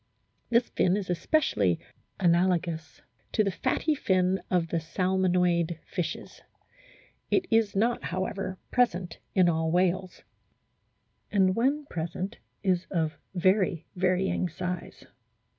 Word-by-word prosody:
This 240 +1 +3
fin 185 +2 +2
is 190 -3 -3
especially 135 - +1 0.4
analogous 170 -3 +1 0.3
to 215 - +3
the 200 - 0
fatty 310 - 0
fin 185 -7 +1
of 175 -3 +1
the 165 - 0
Salmonoid 180 -1 +1
fishes. 180 -4 -5 0.9
It 375 - +2
is 225 -3 +3
not, 230 +4 +1
however, 190 +1 -3
present 185 -8 +1 0.2
in 185 -2 +5
all 160 -1 +1
whales, 185 +1 0 1.1
and, 190 -2 +3
when 275 +5 +1
present, 180 - -4 0.3
is 185 -2 +1
of 160 -4 -1 0.2
very 185 -2 +2
varying 185 0 +1
size. 180 +2 -5
185 Hz, 110 wpm, -28 LUFS, 170-195 Hz, 1.1 s, in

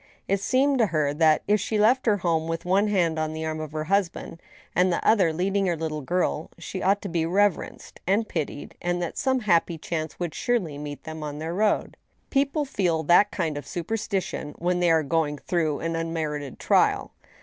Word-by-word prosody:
It 195 0 +1
seemed 265 +5 +2
to 225 - +4
her 155 -4 0
that, 155 0 +3
if 210 +1 +3
she 215 +2 -1
left 235 +5 +3
her 210 -2 +4
home 165 -3 0
with 165 +1 -3
one 195 +4 +3
hand 170 -6 +1
on 155 0 -1
the 160 0 -4
arm 155 0 -3
of 155 -1 -5
her 155 0 -2
husband, 170 -2 -1 0.3
the 180 -1 +3
other 195 -7 +4
leading 190 +4 0
her 170 -2 0
little 155 -1 -3
girl, 170 0 -1
she 190 - -6
ought 200 +2 +2
to - - -3
be 170 -3 0
reverenced 195 +4 0
and 210 +4 +2
pitied, 150 -3 -4
and 175 0 -1
that 175 -2 -3
some 260 -1 +1
happy 170 -4 +2
chance 155 -1 -4
would 175 -3 -3
surely 180 -13 -1
meet 145 -1 -7
them 160 0 -7
on 150 -1 -5
their 160 +2 -4
road. 210 +3 0 0.3
People 280 +2 +1
feel 175 - 0
that 175 +6 +5
kind 160 -8 -2
of 140 - -12
superstition 190 -4 -3
when 180 +1 0
they 175 -1 +3
are 160 -1 +4
going 150 -1 0
through 160 -2 -1
an 165 0 -2
unmerited 155 -4 -3
trial. - - +2
170 Hz, 200 wpm, -25 LUFS, 160-200 Hz, 0.3 s, that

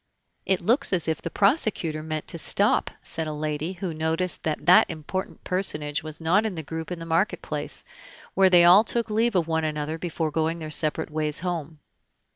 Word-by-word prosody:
"It 190 -1 +2
looks 235 +6 +1
as 175 -3 +2
if 160 - -1
the - - -4
prosecutor 195 - +1
meant 155 -1 -4
to 170 - -3
stop," 205 +6 +3
said 160 -1 -4
a 155 - -4
lady, 150 +3 -3
who 180 -2 -5
noticed 160 +3 -2
that 155 -1 -3
that 180 +1 +6
important 165 +4 -5
personage 150 -6 0
was 155 -1 -6
not 170 +6 +2
in 215 -4 -3
the 160 - -5
group 160 +3 -6
in 180 - -3
the 165 - -8
market 165 +5 0
place, - - -4 0.5
where 190 -1 +5
they 175 -1 +6
all 185 +5 +8
took 230 0 -2
leave 225 +1 +1
of 170 -3 +2
one 160 -1 0
another 155 +1 -3
before 160 -2 -3
going 160 +2 -1
their 155 -2 -7
separate 155 +1 0
ways 155 0 -1
home. 165 -4 -4
165 Hz, 200 wpm, -25 LUFS, 155-185 Hz, 0.5 s, all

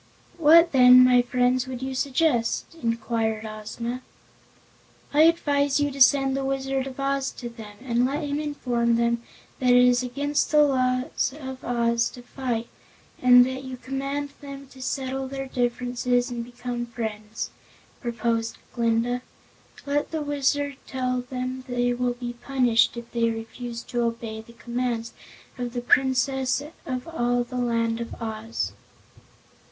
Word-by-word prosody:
"What 330 +2 +7
then, 255 -1 +8
my 250 -1 +6
friends, 250 +1 +1
would 260 -1 -5
you 265 0 -3
suggest?" 260 -2 0
inquired 230 -2 -1
Ozma. 220 +3 -5 1.1
"I 295 - +5
advise 285 -4 +2
you 290 0 +1
to 275 0 -7
send 270 0 +5
the 275 - -1
Wizard 270 0 -1
of 265 0 -9
Oz 275 0 0
to 240 - -7
them, 220 -3 -11
and 240 -2 +1
let 285 +5 0
him 290 0 -2
inform 245 -6 0
them 235 0 +1 0.4
that 255 - +2
it 245 - +7
is 245 0 +4
against 285 +3 -1
the 300 -1 +6
laws 255 0 +1
of 265 -2 -7
Oz 235 -1 +1
to 245 - -11
fight, 240 -3 -3 0.5
and 245 0 +8
that 260 +1 -4
you 260 -1 -7
command 275 +3 -3
them 275 -1 -8
to 265 - -14
settle 265 0 -2
their 270 0 -5
differences 245 0 0
and 235 -1 -3
become 240 0 -5
friends," 220 -2 -5 0.5
proposed 230 -1 -1 0.2
Glinda. 235 +1 +1 0.6
"Let 290 +1 0
the 315 -2 -3
Wizard 285 -1 0
tell 255 -1 -1
them 255 0 -4
they 245 -1 +1
will 245 0 0
be 240 0 -5
punished 245 -2 +2
if 235 0 -8
they 230 -1 +1
refuse 230 +1 -6
to 240 - -2
obey 230 -1 -3
the 235 +1 -16
commands 235 -1 -3 0.5
of 245 -1 -3
the 245 - -2
Princess 260 +1 +2 0.2
of 255 0 -3
all 245 -6 0
the 250 +1 -7
Land 230 -1 0
of 235 - -7
Oz." 225 0 -3
250 Hz, 150 wpm, -25 LUFS, 235-270 Hz, 1.1 s, then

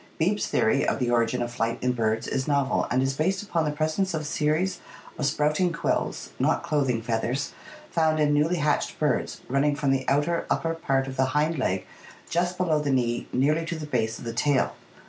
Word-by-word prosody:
Beebe's 195 +6 +1
theory 135 +5 +2
of - - +1
the 125 -3 0
origin 120 +1 +2
of 120 - -4
flight 115 -1 -1
in 125 - +1
birds 110 -2 0
is 135 -1 -2
novel 140 -3 +1
and 130 +1 +2
is 135 0 0
based 185 +8 0
upon 170 -6 0
the 150 - 0
presence 155 +5 0
of 155 -1 -3
series 155 +5 0 0.4
of 145 - +1
sprouting 150 +4 +1
quills 165 - -2
(not - - +2
clothing 135 -6 0
feath 115 -1 -1
ers), 135 +4 -2 0.4
found 160 -2 +2
in 150 -1 +3
newly 150 +4 +2
hatched 150 -1 0
birds, 150 -5 -1
running 140 +2 +2
from 140 -2 +1
the 130 -1 0
outer, 150 +5 +1
upper 165 0 0
part 135 -5 0
of 135 0 -7
the 130 - +3
hind 155 0 +1
leg 95 -6 0 0.4
just 175 +1 0
below 165 -4 +2
the 150 -1 -2
knee 120 -3 0
nearly 150 +6 +2
to 165 0 -4
the 155 - -5
base 110 -6 -1
of - - -10
the 115 - -3
tail. 135 +3 +1
145 Hz, 205 wpm, -26 LUFS, 125-160 Hz, 0.4 s, in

